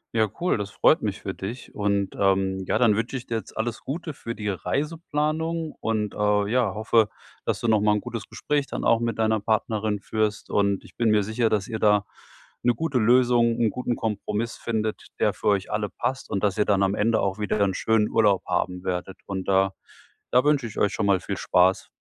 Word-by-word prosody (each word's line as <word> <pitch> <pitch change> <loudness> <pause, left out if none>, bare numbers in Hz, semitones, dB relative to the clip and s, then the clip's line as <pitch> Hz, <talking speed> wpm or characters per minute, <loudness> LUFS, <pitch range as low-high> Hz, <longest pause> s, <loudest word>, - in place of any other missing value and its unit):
Ja, 110 -1 +3
cool. 180 -8 +2
Das 100 -1 -4
freut - - +3
mich - - -2
für - - -5
dich. 115 +6 -7
Und, 100 -2 0
ähm, 95 -1 +1
ja, - - 0
dann 115 -4 +4
wünsche 115 +5 -2
ich 125 - -5
dir 115 - -2
jetzt - - -9
alles 115 +1 -3
Gute 155 +2 -4
für 115 -2 -5
die 105 -2 -4
Reiseplanung 155 - -2
und, 110 -2 -1
äh, 105 -1 +2
ja, 120 -4 +1
hoffe, 110 0 +2 0.4
dass - - 0
du - - -2
noch 110 -2 +4
mal 105 0 +3
'n - - 0
gutes 120 -2 -6
Gespräch 145 -1 -1
dann - - -5
auch 115 - +4
mit 115 -2 -2
deiner 110 0 +2
Partnerin 110 -1 0
führst. 110 0 -2
Und 100 -1 +1
ich - - -17
bin 115 -2 +2
mir 105 -1 +4
sicher, 110 +3 0
dass 105 -2 0
ihr 110 - -3
da 105 -1 +3 0.6
'ne 120 0 +4
gute 140 0 -1
Lösung, 120 0 +4
'n 115 - +3
guten 125 +1 -2
Kompromiss 110 0 -3
findet, 110 -2 -3
der - - +3
für - - -5
euch 100 -1 +1
alle 105 -1 -1
passt. 130 +1 -4
Und 100 - -1
dass 100 -1 +1
ihr 105 - +3
dann 100 -1 +2
am 100 +1 +2
Ende 115 +2 +2
auch 95 +1 -1
wieder 105 0 -1
'n 95 -2 +2
schönen 110 0 +2
Urlaub 105 -4 +3
haben 90 +1 -1
werdet. 90 0 -4
Und 95 -1 -4
da 95 0 +3 0.6
da 125 +1 +4
wünsche 145 -4 +2
ich 110 - -11
euch 100 - +2
schon - - -1
mal 95 -2 +4
viel - - -4
Spaß. 90 +1 +2
110 Hz, 220 wpm, -25 LUFS, 100-120 Hz, 0.6 s, dann